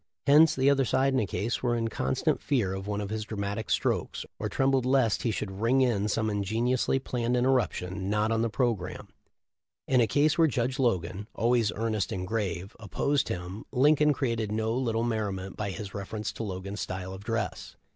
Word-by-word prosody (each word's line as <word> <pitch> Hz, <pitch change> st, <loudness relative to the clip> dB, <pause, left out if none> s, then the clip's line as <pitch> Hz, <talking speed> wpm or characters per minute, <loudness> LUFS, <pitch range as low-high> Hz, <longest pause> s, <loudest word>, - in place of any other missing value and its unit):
Hence 150 Hz, +3 st, +6 dB
the 130 Hz, +1 st, +2 dB
other 140 Hz, -1 st, +4 dB
side 135 Hz, +2 st, +2 dB
in 130 Hz, -, +3 dB
a 110 Hz, -, 0 dB
case 105 Hz, +7 st, -2 dB
were 120 Hz, -1 st, +1 dB
in 115 Hz, -1 st, 0 dB
con 65 Hz, -11 st, -1 dB
stant -, -, 0 dB
fear 115 Hz, -10 st, 0 dB
of 95 Hz, +1 st, -5 dB
one 105 Hz, 0 st, -2 dB
of 100 Hz, 0 st, -5 dB
his 110 Hz, 0 st, -2 dB
dramatic 100 Hz, 0 st, -4 dB
strokes, -, -, 0 dB
or -, -, -2 dB
trem 135 Hz, 0 st, +2 dB
bled 135 Hz, -2 st, +2 dB
lest 130 Hz, -4 st, +2 dB
he 120 Hz, -, 0 dB
should 100 Hz, -2 st, -4 dB
"ring 125 Hz, +4 st, +3 dB
in" 110 Hz, -5 st, +2 dB
some 110 Hz, +1 st, 0 dB
ingeniously 110 Hz, +6 st, 0 dB
planned 125 Hz, -2 st, -1 dB
interruption 100 Hz, -7 st, 0 dB
not 105 Hz, +1 st, +1 dB
on 115 Hz, 0 st, +1 dB
the 115 Hz, -, +1 dB
programme. 120 Hz, -1 st, -2 dB, 0.8 s
In 130 Hz, -2 st, +4 dB
a 115 Hz, -, +3 dB
case 145 Hz, +8 st, +2 dB
where 165 Hz, -, +6 dB
Judge 130 Hz, 0 st, -1 dB
Logan 100 Hz, -4 st, 0 dB
— -, -, -37 dB
always 115 Hz, -2 st, +2 dB
earnest 110 Hz, -2 st, -1 dB
and 90 Hz, -1 st, -3 dB
grave 95 Hz, -3 st, -3 dB
— -, -, -41 dB
opposed 135 Hz, +6 st, 0 dB
him, 90 Hz, +4 st, -5 dB
Lincoln 150 Hz, +3 st, +4 dB
created 115 Hz, -6 st, -1 dB
no 110 Hz, +1 st, 0 dB
little 115 Hz, -2 st, 0 dB
merriment 100 Hz, -5 st, -2 dB
by 105 Hz, -1 st, -3 dB
his 100 Hz, 0 st, -6 dB
reference 105 Hz, +1 st, -4 dB
to -, -, -8 dB
Logan's 100 Hz, 0 st, -5 dB
style 95 Hz, 0 st, -4 dB
of 95 Hz, +1 st, -9 dB
dress. 115 Hz, -1 st, -3 dB
110 Hz, 205 wpm, -28 LUFS, 100-125 Hz, 0.8 s, Hence